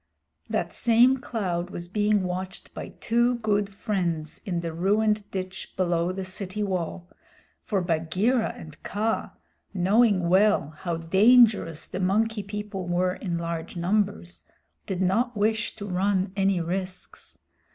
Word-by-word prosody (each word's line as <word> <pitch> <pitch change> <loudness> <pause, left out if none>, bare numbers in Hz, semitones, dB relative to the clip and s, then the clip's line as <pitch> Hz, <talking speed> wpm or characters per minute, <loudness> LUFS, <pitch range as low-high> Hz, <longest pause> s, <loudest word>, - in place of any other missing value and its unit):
That - - -1
same 240 +3 +4
cloud 185 -9 -3
was 175 0 -6
being 210 +1 +1
watched 185 +1 -5
by - - -6
two 235 +2 +2
good 210 -3 0
friends 175 -7 -2
in 175 -3 -1
the 165 -1 -4
ruined 210 +4 +1
ditch 185 0 -6
below 175 -1 +1
the 190 +1 -4
city 190 +2 -4
wall, 180 -2 -3 0.5
for 200 -5 -1
Bagheera 180 +9 +1
and 155 -1 -11
Kaa, 220 +3 -2 0.4
knowing 195 0 +3
well 190 -4 +3
how 165 +2 -4
dangerous 195 -1 +4
the 185 - -5
Monkey 210 +4 +1
People 205 -2 -5
were 180 +1 +1
in 175 -3 -3
large 170 0 -4
numbers, 130 - -1 0.4
did 190 -1 -1
not 230 +6 +1
wish 215 +1 0
to 210 -2 -7
run 190 0 0
any 195 -2 +2
risks. 185 +2 -5
190 Hz, 135 wpm, -26 LUFS, 175-210 Hz, 0.5 s, same